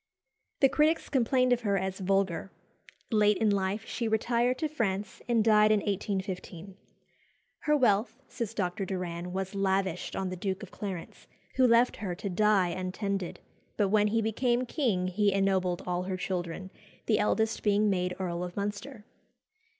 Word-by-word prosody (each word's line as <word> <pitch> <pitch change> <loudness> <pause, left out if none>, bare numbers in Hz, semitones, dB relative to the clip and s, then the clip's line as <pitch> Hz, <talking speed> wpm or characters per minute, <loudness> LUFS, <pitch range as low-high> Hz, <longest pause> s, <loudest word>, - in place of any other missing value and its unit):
The 270 - +6
critics 310 +3 +2
complained 255 -1 +3
of 245 - 0
her 200 -3 +1
as 190 0 -3
vulgar. 195 -1 0 0.6
Late 210 -2 +4
in 220 -2 +2
life 200 +1 -1
she 235 - -3
retired 235 +3 +1
to 310 - -1
France, 210 -9 -2
and 235 -2 +3
died 215 -1 +5
in 210 -1 +3
1815. 190 -2 -4 0.8
"Her 300 0 +2
wealth," 220 -1 +2
says 230 -3 -5
Dr. 180 -1 -1
Doran, 180 -2 -4
"was 190 +1 -3
lavished 190 -2 -1
on 190 -1 -2
the - - -3
Duke 190 +2 -3
of 195 - -10
Clarence, 190 -5 -7 0.3
who 260 -1 +6
left 235 +1 +4
her 185 -4 -4
to 195 +2 -5
die 200 -1 +3
untended; 185 +1 -3 0.4
but 205 -2 +2
when 210 0 +4
he 225 +1 +1
became 240 +3 +1
king 235 - 0
he 200 +2 +2
ennobled 190 -2 +1
all 180 0 -1
her 185 0 -3
children, 185 0 -4 0.3
the 215 -2 +2
eldest 220 +1 +1
being 210 0 +3
made 180 -2 0
Earl 175 -2 -2
of 180 +1 -7
Munster." 210 +4 -4
200 Hz, 160 wpm, -29 LUFS, 185-220 Hz, 0.8 s, The